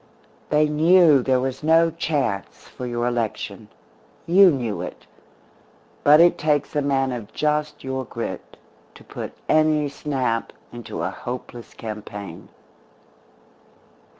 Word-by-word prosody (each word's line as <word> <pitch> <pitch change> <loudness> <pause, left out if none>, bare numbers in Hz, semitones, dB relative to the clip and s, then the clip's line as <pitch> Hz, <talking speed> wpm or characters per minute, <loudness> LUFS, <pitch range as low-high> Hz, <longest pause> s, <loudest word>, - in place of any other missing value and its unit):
They 150 0 +3
knew 155 -1 +5
there 130 0 +2
was 130 0 -3
no 165 +2 +4
chance 140 - -3
for 125 - -7
your 120 0 -2
election. 120 -3 -3 0.6
You 190 +3 +7
knew 120 -9 -2
it. - - -8 1.0
But 150 +1 +7
it 170 +1 +5
takes 150 -1 0
a 145 - +2
man 135 -2 0
of 115 -4 -6
just 150 0 -1
your 130 0 -3
grit 115 -1 -7 0.4
to - - -15
put - - -7
any 155 -1 +3
snap 130 -5 -2 0.2
into 120 -2 -6
a - - -1
hopeless 120 -1 -8
campaign. 105 -5 -8
135 Hz, 125 wpm, -22 LUFS, 120-150 Hz, 1.0 s, You